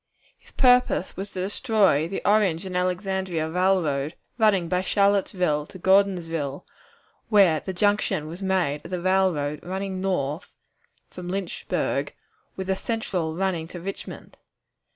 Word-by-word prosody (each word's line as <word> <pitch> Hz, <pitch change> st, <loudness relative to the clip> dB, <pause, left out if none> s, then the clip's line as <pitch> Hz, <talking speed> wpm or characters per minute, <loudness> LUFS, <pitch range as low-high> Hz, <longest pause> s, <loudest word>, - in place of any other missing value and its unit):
His -, -, -18 dB
purpose 250 Hz, -7 st, +3 dB
was 195 Hz, +2 st, -5 dB
to 185 Hz, -, -5 dB
destroy 195 Hz, -, +2 dB
the 195 Hz, -, -5 dB
Orange 200 Hz, -4 st, +3 dB
and 185 Hz, -1 st, -5 dB
Alexandria 180 Hz, -2 st, -1 dB
Railroad, 165 Hz, -4 st, +1 dB, 0.2 s
running 200 Hz, -6 st, +3 dB
by 180 Hz, +2 st, +1 dB
Charlottesville 185 Hz, -6 st, +1 dB
to -, -, -11 dB
Gordonsville, 175 Hz, -6 st, +1 dB, 0.6 s
where 195 Hz, -8 st, +5 dB
the 190 Hz, -, -5 dB
junction 195 Hz, -3 st, +1 dB
was 170 Hz, +5 st, -8 dB
made 185 Hz, -7 st, 0 dB
of -, -, -9 dB
the 180 Hz, -1 st, -2 dB
railroad 175 Hz, -6 st, +1 dB
running 190 Hz, +1 st, -4 dB
north 170 Hz, -4 st, -2 dB, 0.6 s
from 180 Hz, -1 st, -8 dB
Lynchburg, 190 Hz, -1 st, -2 dB, 0.4 s
with 190 Hz, -, -4 dB
the 190 Hz, 0 st, 0 dB
Central 190 Hz, -7 st, -2 dB
running 180 Hz, -3 st, -1 dB
to 175 Hz, -, -8 dB
Richmond. 195 Hz, +3 st, -8 dB
185 Hz, 130 wpm, -25 LUFS, 165-195 Hz, 0.6 s, where